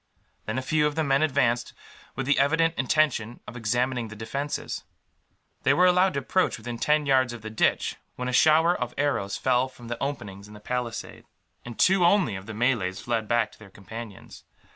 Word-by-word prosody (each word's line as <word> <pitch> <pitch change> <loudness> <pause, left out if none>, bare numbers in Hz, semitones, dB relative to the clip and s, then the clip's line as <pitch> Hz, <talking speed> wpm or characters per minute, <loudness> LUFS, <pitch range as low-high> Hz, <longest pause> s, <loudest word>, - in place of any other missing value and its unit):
Then 110 +3 -2
a 130 - -2
few 150 +3 +2
of 150 - -4
the 160 - +1
men 140 -1 +2
advanced, 125 -5 +1 0.4
with 135 - -3
the 145 +1 +2
evident 165 +4 +3
intention 125 -5 +1
of 105 - -9
examining 120 +1 -1
the 110 - -10
defences. 135 +7 -4 0.8
They - - +3
were 180 - +5
allowed 180 -1 +4
to 140 - 0
approach 185 +8 +1
within 120 +1 -7
ten 150 +2 +2
yards 130 -3 +3
of 115 -3 -9
the 110 - -6
ditch, 110 - +1 0.2
when 125 - -4
a 125 - -2
shower 160 +5 +5
of 125 -1 -4
arrows 135 -9 0
flew 130 0 +2
from 120 -2 -13
the 120 - -5
openings 100 -8 -5
in 105 - -13
the - - -11
palisade; 120 +1 -5 0.4
and 120 -1 -9
two, 190 -1 +4
only, 175 - +3
of 95 +1 -8
the 110 - -7
Malays 110 -5 0
fled 115 -2 -2
back 120 0 +1
to - - -19
their 110 -2 -13
companions. 105 +2 -10
125 Hz, 200 wpm, -26 LUFS, 115-145 Hz, 0.8 s, were